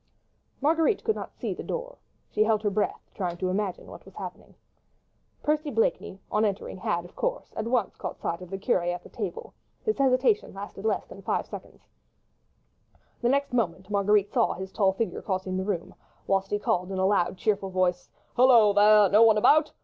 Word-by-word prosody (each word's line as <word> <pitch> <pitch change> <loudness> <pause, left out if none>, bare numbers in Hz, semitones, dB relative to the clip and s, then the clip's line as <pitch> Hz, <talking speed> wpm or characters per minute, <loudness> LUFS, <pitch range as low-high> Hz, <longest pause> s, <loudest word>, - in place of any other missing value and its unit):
Marguerite 325 +8 +2
could 440 -1 +1
not - - -7
see - - -3
the - - -7
door: - - -5 0.3
she 215 - +3
held 215 -1 +1
her 205 - +1
breath, 210 +1 -2
trying 175 -3 -3
to 185 +1 -1
imagine 195 0 -2
what - - -12
was - - -16
happening. - - -9 0.9
Percy 300 0 0
Blakeney 225 -5 -1
on 215 - +2
entering 200 -2 -2
had, 175 -1 -2
of 175 - -15
course, - - -3
at 220 - -3
once 235 -5 0
caught - - -5
sight 170 +1 -3
of 180 - -9
the 195 - -4
curé 175 -2 +1
at 180 - -10
the - - -13
table; 200 -6 -6 0.3
his 435 -7 -1
hesitation 270 - +2
lasted 200 +1 -8
less 215 -3 0
than 195 - -12
five - - -1
seconds, - - -11 1.4
the 240 - +2
next 280 0 +1
moment 190 -4 -1
Marguerite 205 0 +2
saw 235 -3 +2
his 190 +1 -7
tall 195 -2 +2
figure 220 +4 -3
crossing 185 -1 -3
the 190 - -1
room, 190 -4 -3 0.3
whilst 195 0 0
he 205 - 0
called 185 -2 -1
in 190 - -3
a 190 - +2
loud, 190 -2 +1
cheerful 200 -2 0
voice,— 180 -1 0 0.3
"Hello, 235 -5 +6
there! 210 0 +6
no 205 +4 +5
one 225 -2 +6
about? 305 +8 +4
205 Hz, 195 wpm, -27 LUFS, 190-240 Hz, 1.4 s, Hello